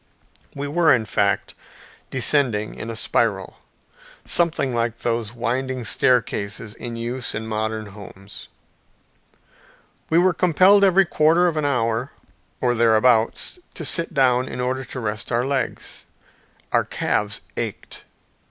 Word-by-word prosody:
We 140 Hz, +1 st, -4 dB
were, 160 Hz, +2 st, +3 dB
in 115 Hz, -5 st, +3 dB
fact, 100 Hz, 0 st, 0 dB, 0.6 s
descending 125 Hz, -4 st, +1 dB
a 115 Hz, -, -4 dB
spiral, -, -, -1 dB, 0.7 s
something 155 Hz, -6 st, +1 dB
like 115 Hz, -1 st, -1 dB
those 115 Hz, -2 st, -2 dB
winding 125 Hz, +2 st, -2 dB
staircases 110 Hz, -3 st, 0 dB
in 120 Hz, +1 st, -7 dB
use 120 Hz, +2 st, -4 dB
in 110 Hz, +1 st, -4 dB
modern 110 Hz, 0 st, -2 dB
houses. 100 Hz, -1 st, -11 dB, 1.6 s
We 160 Hz, -, +3 dB
were 180 Hz, +1 st, +4 dB
compelled 185 Hz, +4 st, +4 dB
every 195 Hz, 0 st, +5 dB
quarter 165 Hz, +1 st, +3 dB
of 170 Hz, -3 st, +1 dB
an 155 Hz, -1 st, -1 dB
hour 120 Hz, -2 st, -1 dB, 0.5 s
or 120 Hz, -1 st, +1 dB
thereabouts 115 Hz, -, +2 dB, 0.2 s
to -, -, -5 dB
sit 170 Hz, -1 st, 0 dB
down 130 Hz, -4 st, +2 dB
in 125 Hz, -, -6 dB
order 130 Hz, +1 st, -1 dB
to 125 Hz, -, -7 dB
rest 105 Hz, -2 st, -3 dB
our 120 Hz, +1 st, +1 dB
legs. 135 Hz, 0 st, -3 dB, 0.7 s
Our -, -, +3 dB
calves -, -, -1 dB
ached. -, -, -6 dB
125 Hz, 125 wpm, -22 LUFS, 110-145 Hz, 1.6 s, every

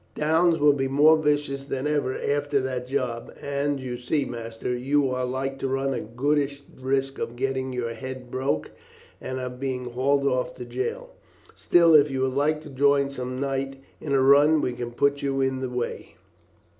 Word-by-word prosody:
Downes 160 Hz, +2 st, +3 dB
will 145 Hz, -1 st, +5 dB
be 135 Hz, -1 st, -1 dB
more 145 Hz, +4 st, +6 dB
vicious 145 Hz, -3 st, 0 dB
than 135 Hz, -1 st, -3 dB
ever 145 Hz, -3 st, 0 dB
after 145 Hz, 0 st, 0 dB
that 130 Hz, -1 st, -3 dB
job, 125 Hz, -3 st, -2 dB
and 140 Hz, 0 st, -1 dB
you 125 Hz, -2 st, -5 dB
see, 140 Hz, +3 st, 0 dB
master, 115 Hz, +1 st, -4 dB
you 135 Hz, +2 st, +1 dB
are 125 Hz, 0 st, -1 dB
like 135 Hz, +2 st, -3 dB
to 135 Hz, -, -1 dB
run 135 Hz, +1 st, 0 dB
a 120 Hz, -, -3 dB
goodish 140 Hz, +4 st, -1 dB
risk 135 Hz, +1 st, -1 dB
of 120 Hz, -, -4 dB
getting 130 Hz, +1 st, -2 dB
your 120 Hz, -2 st, -3 dB
head 130 Hz, +1 st, -8 dB
broke 130 Hz, -, -1 dB, 0.5 s
and 130 Hz, 0 st, -4 dB
of 125 Hz, -1 st, -6 dB
being 130 Hz, -2 st, -3 dB
hauled 140 Hz, +3 st, +1 dB
off 130 Hz, -2 st, 0 dB
to 125 Hz, -, -7 dB
jail. 130 Hz, -, -4 dB, 0.4 s
Still, 170 Hz, -2 st, +4 dB
if 150 Hz, -1 st, +6 dB
you 135 Hz, -1 st, -2 dB
would 130 Hz, 0 st, 0 dB
like 150 Hz, +3 st, +1 dB
to 155 Hz, -, -11 dB
join 140 Hz, +1 st, +3 dB
some 130 Hz, -1 st, -5 dB
night 135 Hz, 0 st, -2 dB, 0.2 s
in 150 Hz, -, -6 dB
a 135 Hz, -1 st, +4 dB
run 145 Hz, +3 st, +6 dB
we 125 Hz, -, -1 dB
can 120 Hz, 0 st, -5 dB
put 140 Hz, +3 st, +1 dB
you 135 Hz, -1 st, -1 dB
in 130 Hz, -1 st, 0 dB
the 130 Hz, -, -2 dB
way." 125 Hz, -1 st, -4 dB
135 Hz, 190 wpm, -25 LUFS, 130-145 Hz, 0.5 s, more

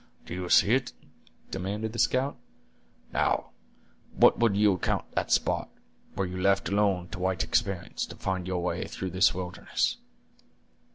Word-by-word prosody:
"Do -, -, -7 dB
you 90 Hz, 0 st, -4 dB
see 100 Hz, -, +5 dB
it?" 130 Hz, -1 st, 0 dB, 0.6 s
demanded 105 Hz, +4 st, -3 dB
the 115 Hz, -, -5 dB
scout. 130 Hz, +5 st, +2 dB, 0.8 s
"Now, -, -, 0 dB, 0.6 s
what -, -, +5 dB
would 115 Hz, -4 st, +3 dB
you 105 Hz, -1 st, +5 dB
account 90 Hz, -, -1 dB
that -, -, -2 dB
spot, -, -, +1 dB, 0.5 s
were 95 Hz, -, 0 dB
you 90 Hz, 0 st, -5 dB
left 100 Hz, +1 st, +2 dB
alone 100 Hz, -3 st, +1 dB
to 95 Hz, -, -7 dB
white 95 Hz, -1 st, 0 dB
experience 100 Hz, -6 st, -1 dB
to -, -, -10 dB
find 95 Hz, -1 st, -3 dB
your 90 Hz, -2 st, -2 dB
way 90 Hz, -, -2 dB
through 95 Hz, -1 st, -5 dB
this 90 Hz, 0 st, +4 dB
wilderness?" 90 Hz, 0 st, -2 dB
95 Hz, 155 wpm, -28 LUFS, 90-105 Hz, 0.8 s, see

